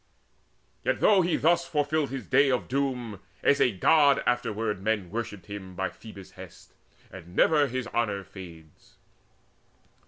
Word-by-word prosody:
Yet, - - 0
though 200 -3 +5
he 175 -1 +1
thus 170 +2 +2
fulfilled 150 -1 0
his 135 0 -6
day 135 +2 +4
of 125 -2 0
doom, 125 -6 -2 0.2
As 140 - +3
a 125 - +4
God 140 - +4
afterward 110 -4 -1
men 105 -3 -1
worshipped 105 -3 -5
him 100 -3 -8
By 95 0 -2
Phoebus' 100 -4 -12
hest, - - -13 0.4
and 90 -1 -12
never 150 +3 +4
his 130 -1 -3
honour 105 -4 -1
fades. 85 -5 -14
115 Hz, 145 wpm, -27 LUFS, 100-140 Hz, 0.4 s, though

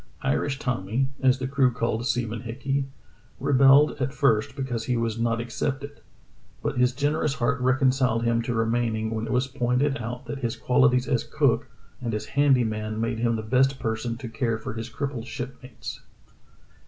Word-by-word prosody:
Irish 135 0 0
Tommy, 125 0 -1
as 130 -1 +4
the 130 0 -3
crew 135 -1 +3
called 115 0 -1
Seaman 115 -2 -1
Hickey, 135 +4 -2 0.5
rebelled 140 +2 +6
at 130 +2 -1
first 115 -5 +2
because 125 -5 -3
he 125 0 0
was 115 -1 -1
not 115 0 +1
accepted, 135 +4 -4 0.6
but - - -1
his 125 0 +4
generous 145 +2 0
heart 125 +2 0
reconciled 130 -2 +2
him 115 0 +2
to 115 0 -2
remaining 115 -1 0
when 110 0 -2
it - - -4
was 125 +1 +2
pointed 130 +2 0
out 125 +3 -5
that 140 - -5
his 120 -3 -2
qualities 125 0 +3
as 125 -5 +1
cook - - +1 0.3
and 115 -3 -2
as 105 - -3
handy 140 -2 +3
man 110 -1 -3
made 115 0 -1
him 115 0 +1
the 110 - -3
best 130 +4 +2
person 115 0 -2
to 125 -1 -7
care 115 0 -1
for 110 - -6
his 115 +1 -5
crippled 130 -1 -4
ship 125 +3 -6
mates. 125 0 -8
125 Hz, 180 wpm, -26 LUFS, 115-135 Hz, 0.6 s, rebelled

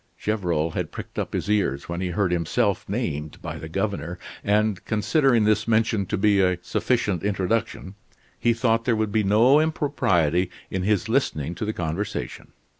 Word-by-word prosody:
Gevrol 85 -7 -1
had - - -3
pricked - - -7
up - - -3
his - - -2
ears 100 -10 0
when 85 +1 -4
he 95 - -1
heard 90 +1 0
himself 95 +5 0
named 80 - -3
by 80 +1 -6
the 80 +2 -8
governor, 90 -2 -2 0.3
and 105 -1 +1
considering 120 +2 +2
this 110 +1 +2
mention 110 -3 +2
to 105 - -1
be 100 0 +3
a 90 -1 +2
sufficient 105 -2 0
introduction, 100 -1 -1 0.5
he 120 - +3
thought 115 -1 +1
there 120 - +2
would 110 -1 -1
be 110 0 +2
no 115 +8 +5
impropriety 95 - +1 0.2
in 95 - -1
his 105 +2 +1
listening 90 - 0
to 110 - -4
the 105 - -1
conversation. 85 +3 -4
105 Hz, 170 wpm, -24 LUFS, 90-110 Hz, 0.5 s, no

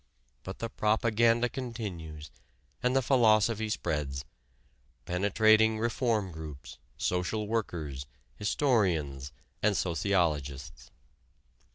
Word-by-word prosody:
But 95 - -7
the 115 - -3
propaganda 115 +2 +2
continues 95 - -6 0.5
and 125 +1 +1
the 135 - +3
philosophy 110 -3 +3
spreads, 70 -8 -2 0.8
penetrating 110 +4 +3
reform 115 -3 0
groups, 75 -4 -9 0.2
social 90 +4 -1
workers, 80 -11 -3 0.3
historians, 90 - 0 0.3
and 105 -2 +2
sociologists. 75 -7 -1
100 Hz, 80 wpm, -30 LUFS, 75-110 Hz, 0.8 s, the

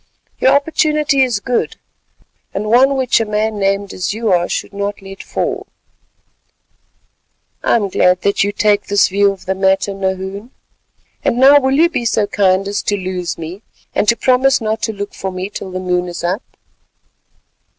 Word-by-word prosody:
Your 265 - +4
opportunity 300 -1 +2
is 245 -5 +1
good, 245 +3 -1 0.8
and 200 +2 -2
one 265 +3 +5
which 260 -3 +2
a - - +1
man 215 0 -1
named 195 0 0
as 185 +3 -3
you 225 -2 -1
are 175 -1 +2
should - - -4
not 200 0 -3
let 195 -1 -10
fall." - - -3 1.9
"I - - +2
am 215 -4 +1
glad - - -13
to - - -4
find 180 0 +4
that 200 0 +2
you 205 - 0
take 210 0 +1
this 200 -1 +3
view 200 +1 +3
of 195 - -11
the 190 - 0
matter, 190 +1 +1
Nahoon. 190 +3 -4 0.7
And 235 - +1
now 275 +3 +7
will 265 0 +1
you 325 +4 +5
be 245 -8 -3
so 220 -2 +1
kind 195 -1 +1
as 205 0 -2
to 205 - -1
lose 185 -2 -4
me, 165 +5 -7 0.3
and 210 - 0
to 235 - +5
promise 260 +1 +3
not 220 -1 -2
to 220 - -1
look 205 -1 -6
for 190 - -5
me 185 +2 -5
till 195 - -6
the 185 0 -5
moon 180 -1 -1
is 175 -1 -6
up?" 185 +6 -1
205 Hz, 185 wpm, -16 LUFS, 190-235 Hz, 1.9 s, now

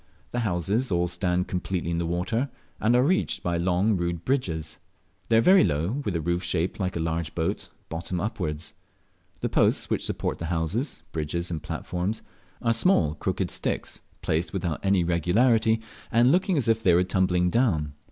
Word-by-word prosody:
The 120 - -1
houses 100 +3 0
all 90 0 +2
stand 90 +1 0
completely 90 -2 -2
in 85 - 0
the 85 - -1
water, 95 +10 -1 0.3
and 115 +3 +3
are 125 - +5
reached 185 +7 +1
by 85 -1 0
long 90 +5 +2
rude 85 -2 -2
bridges. 85 - -1 0.5
They 115 - +5
are - - +6
very 185 +7 +6
low, 85 - 0
with 100 -7 -2
the 85 - 0
roof 85 +2 0
shaped 90 -1 -1
like 95 -2 -1
a - - -1
large 80 0 -2
boat, 80 -1 -2 0.2
bottom 85 +2 -4
upwards. 85 -7 -3 0.7
The - - 0
posts - - +2
which - - 0
support - - -2
the 85 - -4
houses, 85 - -1
bridges, 85 +3 -2
and 80 -3 -3
platforms 90 +5 -3 0.4
are 115 - +3
small 115 - +3
crooked 75 - -2
sticks, - - -2 0.2
placed 80 +3 0
without 85 -5 -2
any 95 -2 +3
regularity, 110 +7 +3 0.3
and 120 +3 +5
looking 185 0 +2
as 130 - +1
if 115 0 +3
they 90 -5 +4
were 90 - +4
tumbling 90 -1 +1
down. 85 - +1
90 Hz, 180 wpm, -26 LUFS, 85-115 Hz, 0.7 s, are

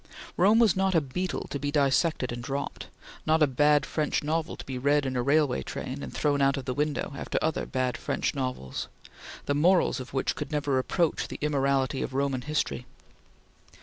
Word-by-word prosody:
Rome 200 +5 +5
was 230 -5 +5
not 190 -1 +1
a - - +6
beetle 165 +6 -3
to 140 - -2
be 145 - -2
dissected 145 -1 +2
and 120 0 -5
dropped; 140 +2 -4 0.4
not 155 0 +4
a - - +8
bad 145 +2 +3
French 150 -2 -1
novel 160 +2 -1
to - - -9
be 130 -2 -4
read 145 +2 +2
in 130 -1 -2
a 125 - +1
railway 140 - +2
train 70 - -5
and 65 -2 -6
thrown 145 -1 +1
out 140 +1 +3
of 135 - -5
the 125 - -2
window 150 +1 -1
after - - -3
other 160 -1 -1
bad 125 -2 -1
French - - -1
novels, 130 - -4 0.6
the 145 - +1
morals 170 +2 +3
of 130 - -8
which 135 - -1
could - - -5
never 145 -3 +1
approach 165 +5 0
the - - -7
immorality 140 -2 +1
of 130 - -4
Roman 135 -2 0
history. 150 - -2
140 Hz, 195 wpm, -28 LUFS, 130-155 Hz, 0.6 s, a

